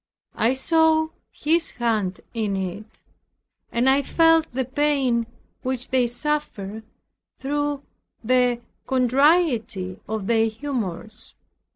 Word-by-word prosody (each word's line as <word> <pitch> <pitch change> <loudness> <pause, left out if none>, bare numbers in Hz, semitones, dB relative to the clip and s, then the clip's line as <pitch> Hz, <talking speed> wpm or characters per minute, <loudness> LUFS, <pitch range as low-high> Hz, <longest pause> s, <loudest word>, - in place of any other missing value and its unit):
I 235 +3 +2
saw 315 +3 +3 0.2
His 325 +2 0
hand 215 -6 0
in 215 -4 -1
it, 195 +3 -6 0.7
and 235 +2 +1
I 270 +1 +5
felt 325 +2 +3
the 260 +1 -1
pain 265 -4 +1 0.3
which 255 -1 -2
they 255 -2 +2
suffered, 235 -6 -3 0.6
through 290 0 -2 0.4
the 245 0 +2 0.3
contrariety 255 - +2
of 215 -2 -3
their 225 +1 +3
humors. 220 -4 -5
250 Hz, 100 wpm, -23 LUFS, 220-290 Hz, 0.7 s, I